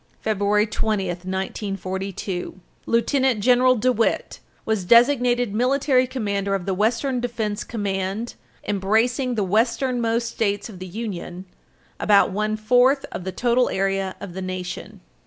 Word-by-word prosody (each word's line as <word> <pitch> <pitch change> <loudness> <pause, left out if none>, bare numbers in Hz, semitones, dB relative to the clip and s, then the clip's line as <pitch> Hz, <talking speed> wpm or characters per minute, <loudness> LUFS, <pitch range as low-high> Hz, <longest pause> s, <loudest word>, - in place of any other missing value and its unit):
February 210 0 +1
20, 215 -2 -1
1942, 190 0 -4 0.3
Lieutenant 255 +1 +2
General 250 +3 +4
DeWitt 240 0 0 0.3
was 220 -4 0
designated 245 +1 +4
Military 255 +2 +2
Commander 200 -6 -1
of 185 -3 -4
the 195 - 0
Western 230 +6 0
Defense 225 -4 -3
Command 200 +1 -3 0.3
embracing 225 +6 +1
the 210 - 0
westernmost 235 +3 +1
states 205 -2 -1
of 190 -5 -11
the 185 - -7
Union 185 -3 -6 0.5
about 205 -1 +4
one 215 +2 -1
fourth 250 +5 +3
of 180 - -6
the 190 - -2
total 245 +4 +2
area 195 0 -1
of 200 -3 -8
the 190 - -5
nation. 185 -1 -6
215 Hz, 125 wpm, -23 LUFS, 195-245 Hz, 0.5 s, General